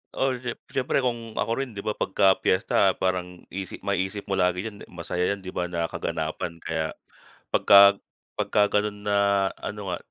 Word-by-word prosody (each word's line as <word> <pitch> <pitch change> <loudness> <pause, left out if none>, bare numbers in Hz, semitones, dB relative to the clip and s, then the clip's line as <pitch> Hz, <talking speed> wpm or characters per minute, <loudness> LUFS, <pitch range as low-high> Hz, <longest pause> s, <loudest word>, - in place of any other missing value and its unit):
Ol 130 -2 -1
jep 120 -1 -4
siyempre, 130 0 0
kung 115 -3 -3
ako - - 0
rin 130 - -8
di 100 - -8
ba? 105 +1 -2
Pagka 95 0 +3
piyesta 95 +1 +3
parang 90 -1 -2
isip 95 -1 -6
ma-isip 95 +2 -2
mo 95 - 0
lagi 90 +3 +1
yan, 105 -2 -10
masaya 90 +1 -3
yan, 100 - -3
di 95 -1 -9
ba, 90 0 -2
na 85 -1 -1
kaganapan. 85 +1 -4
Kaya, 80 -1 -2 0.6
pagka 100 0 +8 0.4
pagka 105 -1 +2
ganon 105 0 -4
na, 100 - +2 0.4
ano 105 -1 -6
nga 90 - -2
100 Hz, 170 wpm, -25 LUFS, 90-105 Hz, 0.6 s, pagka